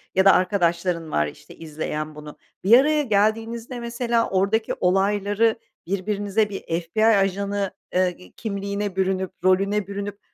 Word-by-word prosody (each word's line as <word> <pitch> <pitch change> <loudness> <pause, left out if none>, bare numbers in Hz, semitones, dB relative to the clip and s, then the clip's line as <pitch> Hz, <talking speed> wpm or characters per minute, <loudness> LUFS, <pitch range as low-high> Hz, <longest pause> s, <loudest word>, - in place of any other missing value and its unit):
ya 190 +1 +4
da 195 - +8
arkadaşların 175 -3 0
var, 75 0 +1
işte, 75 - -12
izleyen 155 -1 -5
bunu. 150 0 -10 0.3
Bir 225 +6 +7
araya 300 +2 +3
geldiğinizde 225 +1 0
mesela 235 0 -1
oradaki 200 +4 +1
olayları 205 +4 +2 0.3
birbirinize 205 +2 0
bir 195 - -6 0.2
FBI 215 +6 0
ajanı, 200 -1 +1 0.2
eee, 180 0 -1
kimliğine 200 -2 -3
bürünüp 190 -1 0
rolüne 195 +2 +2
bürünüp 200 0 -5
200 Hz, 130 wpm, -23 LUFS, 185-215 Hz, 0.3 s, da